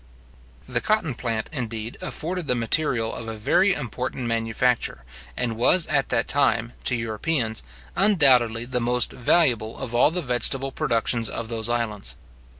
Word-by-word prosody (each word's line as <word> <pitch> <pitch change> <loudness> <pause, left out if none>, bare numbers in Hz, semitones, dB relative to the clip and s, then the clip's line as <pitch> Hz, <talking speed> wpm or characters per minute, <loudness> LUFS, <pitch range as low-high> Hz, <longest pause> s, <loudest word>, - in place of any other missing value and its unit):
The - - -1
cotton 215 -10 0
plant, 115 -2 -3
indeed, 115 -4 -4
afforded 175 0 -4
the 125 - +2
material 115 -1 +1
of 115 - -7
a 110 -1 -5
very 185 - +3
important 125 -2 -4
manufacture, 115 - 0 0.3
and 120 -2 -2
was 155 +9 +4
at - - 0
that - - 0
time, - - +1
to - - +3
Europeans, 115 - -1 0.3
undoubtedly 125 - +4
the 125 0 -2
most 125 +1 +2
valuable 120 -5 +1
of 130 -3 -5
all 120 - +5
the 175 +2 -3
vegetable 135 +2 -1
productions 115 -1 0
of 115 -1 -5
those 115 -1 -2
islands. 115 -4 -2
120 Hz, 150 wpm, -24 LUFS, 115-135 Hz, 0.3 s, all